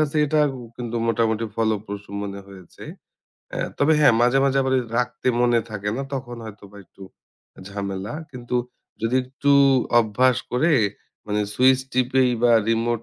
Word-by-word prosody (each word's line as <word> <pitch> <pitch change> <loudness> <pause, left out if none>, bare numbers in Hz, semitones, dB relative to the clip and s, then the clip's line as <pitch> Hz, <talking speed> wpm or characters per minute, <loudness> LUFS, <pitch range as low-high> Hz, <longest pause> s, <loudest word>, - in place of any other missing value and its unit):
কাছে 155 0 0
এটা 155 +1 +2 0.4
কিন্তু 120 -1 -5
মোটামুটি 115 0 +1
ফলোপ্রসূ 105 -2 -2
মনে 100 -1 -6
হয়েছে। 95 -3 -13 0.7
আ - - -4 0.2
তবে 145 +3 +3
হ্যাঁ 135 -6 +6
মাঝে, 125 +3 +4
মাঝে 135 0 +2
আবার 130 0 0 0.2
রাখতে 125 +1 -3
মনে 120 -1 +3
থাকে 105 -1 -3
না। 135 - -3
তখন 120 -2 -6
হয়তো 105 -2 -11
বা 105 - -15
একটু 95 - -18 0.7
ঝামেলা। 100 +3 -5 0.2
কিন্তু 125 -1 -4 0.5
যদি 115 +3 +1
একটু 140 +2 -2 0.5
অভ্যাস 125 +3 +2 0.2
করে 155 +7 +2 0.5
মানে 105 0 -1
সুইচ 130 +1 +4
টিপে 130 +1 +2 0.2
বা 120 -1 +5 0.2
রিমোট 115 0 0
120 Hz, 145 wpm, -22 LUFS, 105-130 Hz, 0.7 s, হ্যাঁ